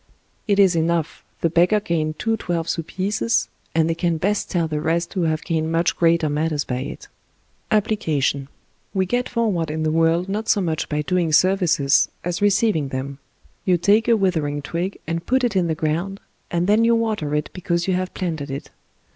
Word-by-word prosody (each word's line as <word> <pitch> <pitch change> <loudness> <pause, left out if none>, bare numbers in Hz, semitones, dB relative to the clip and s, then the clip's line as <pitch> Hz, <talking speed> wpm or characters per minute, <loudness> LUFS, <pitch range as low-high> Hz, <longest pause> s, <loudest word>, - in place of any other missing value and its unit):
It 200 -2 +2
is 190 -3 +5
enough, 165 -1 -1 0.2
the 165 - +2
beggar 175 +5 +4
gained 155 -5 -2
two 225 0 0
twelve 170 -5 -3
sous 165 - -1
pieces, 205 +5 0 0.3
and 160 -1 +3
they 165 - +1
can 165 0 0
best 200 +6 -1
tell 170 -3 0
the 150 -1 -3
rest 170 +2 -1
who 180 -4 0
have 155 -1 -1
gained 160 -1 -1
much 165 +1 +1
greater 165 -2 +3
matters 150 0 0
by 125 - -3
it 135 +3 -7 0.6
APPLICATION 160 -10 0 0.5
We 190 -1 +2
get 245 +6 -1
forward 205 -9 0
in 155 +1 -2
the 155 - +1
world 165 +2 +2
not 210 +3 -3
so 205 - +4
much 165 -5 -2
by 150 0 -1
doing 175 0 0
serv 185 +5 +4
ices 140 -5 +3
as 175 +1 -3
receiving 205 -6 +2
them. 135 +1 -5 0.4
You 180 -2 +3
take 205 +6 +3
a 230 -1 +5
withering 155 -7 0
twig 175 +6 -3
and 165 +1 -3
put 260 +1 +2
it 235 -5 0
in 180 -2 +2
the 160 - 0
ground, 170 +6 -2 0.3
and 175 0 0
then 210 +4 +4
you 230 0 +4
water 215 -10 -1
it 150 0 -2
because 175 -1 -1
you 190 - +2
have 185 0 -2
planted 160 -6 -3
it. 135 +1 -6
170 Hz, 195 wpm, -22 LUFS, 155-195 Hz, 0.6 s, is